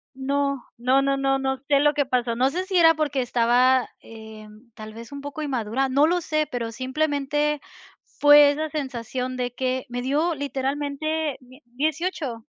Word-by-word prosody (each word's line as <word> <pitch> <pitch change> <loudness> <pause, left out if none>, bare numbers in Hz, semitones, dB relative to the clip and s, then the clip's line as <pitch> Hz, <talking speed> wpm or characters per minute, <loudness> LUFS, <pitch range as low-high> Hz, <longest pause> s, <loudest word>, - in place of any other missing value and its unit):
No. 275 0 -1
No, 255 +3 +3
no, 275 0 +1
no, 270 0 +1
no, 265 0 -1
no 260 - -29
sé 280 -1 +4
lo 295 0 +3
que 285 -2 0
pasó. 245 -3 0
No 260 +2 +2
sé 360 +5 -3
si 380 - -2
era 325 -1 +6
porque 295 -3 -1
estaba, 245 +1 +3
eh, 220 -1 -12 0.3
tal 215 -1 -10
vez 230 +4 -11
un 280 - -6
poco 285 +2 -6
inmadura, 260 -1 -1
no 280 +4 +3
lo 355 +2 +1
sé, 310 -2 -1
pero 230 -2 -4
simplemente 290 +3 -1 0.4
fue 290 0 +6
esa 310 +2 -2
sensación 255 -3 -4
de 245 -1 -3
que 260 0 -2
me 245 0 -4
dio 300 +6 0
literalmente 285 +2 -2
die 255 +3 -18
18. 285 -2 -3
270 Hz, 175 wpm, -24 LUFS, 250-295 Hz, 0.4 s, era